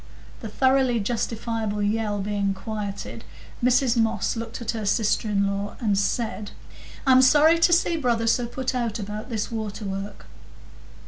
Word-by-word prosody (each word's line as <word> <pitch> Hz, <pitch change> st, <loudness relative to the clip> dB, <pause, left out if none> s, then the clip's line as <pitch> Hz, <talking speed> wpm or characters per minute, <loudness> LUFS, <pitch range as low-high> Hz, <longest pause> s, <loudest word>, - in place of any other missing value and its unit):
The 225 Hz, -, -7 dB
thoroughly 260 Hz, 0 st, +2 dB
justifiable 220 Hz, -1 st, -2 dB
yell 210 Hz, -1 st, 0 dB
being 200 Hz, -1 st, -1 dB
quieted, 210 Hz, +1 st, -6 dB, 0.4 s
Mrs 250 Hz, 0 st, +3 dB
Moss 225 Hz, -1 st, +1 dB
looked 230 Hz, 0 st, -5 dB
at 230 Hz, -2 st, -2 dB
her 225 Hz, -2 st, -4 dB
sister 210 Hz, +1 st, +1 dB
in 200 Hz, -1 st, +2 dB
law 200 Hz, +1 st, -3 dB
and 210 Hz, -4 st, +1 dB
said,— 210 Hz, +1 st, -1 dB, 0.6 s
"I'm 260 Hz, -1 st, +6 dB
sorry 305 Hz, +5 st, +5 dB
to 335 Hz, -, +4 dB
see 340 Hz, 0 st, +3 dB
brother 240 Hz, -6 st, 0 dB
so 235 Hz, +1 st, +2 dB
put 260 Hz, +2 st, -3 dB
out 235 Hz, -3 st, -1 dB
about 210 Hz, +2 st, -6 dB
this 220 Hz, -2 st, -3 dB
water 215 Hz, -2 st, -4 dB
work." 195 Hz, +1 st, -6 dB
225 Hz, 150 wpm, -24 LUFS, 205-245 Hz, 0.6 s, I'm